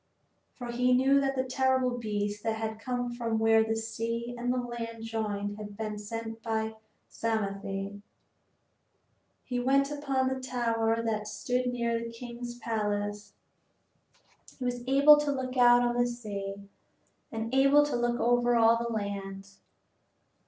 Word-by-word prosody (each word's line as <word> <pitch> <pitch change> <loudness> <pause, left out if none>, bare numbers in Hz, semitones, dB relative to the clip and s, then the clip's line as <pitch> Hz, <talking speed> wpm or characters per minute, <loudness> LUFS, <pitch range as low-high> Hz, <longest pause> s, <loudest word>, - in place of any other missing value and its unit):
For 245 -2 -6
he 250 +1 +3
knew 270 +2 +4
that 270 0 0
the 260 - +1
terrible 260 -1 +1
beast 205 -2 -2
that 225 0 -1
had 220 0 -4
come 245 0 -2
from 230 -2 -1
where 225 0 +5
the 225 0 -1
sea 230 +1 -3
and 245 +1 -1
the 255 - 0
land 235 -2 -5
joined 210 -2 -3
had 205 -1 -8
been 215 -1 -4
sent 225 +1 -6
by 220 -1 -1 0.3
Psamathe. 200 -2 -3 1.4
He 250 -1 -2
went 275 +3 +2
up 290 -1 -7
on 260 -1 +2
the 260 0 -1
tower 230 -3 0
that 215 -2 -1
stood 250 +3 -1
near 235 -2 0
the 230 0 -5
king's 240 0 -7
palace. 210 -2 -2 1.2
He 255 - -4
was 245 -1 -2
able 280 +3 +8
to 295 -1 0
look 260 -2 -3
out 245 -1 +6
on 240 0 +1
the 245 0 +3
sea 200 -4 -6 0.6
and 225 +1 -4
able 275 +2 +6
to 290 - -2
look 240 0 0
over 245 0 +3
all 230 0 +5
the 235 0 -3
land. 200 -2 -4
235 Hz, 150 wpm, -29 LUFS, 220-250 Hz, 1.4 s, able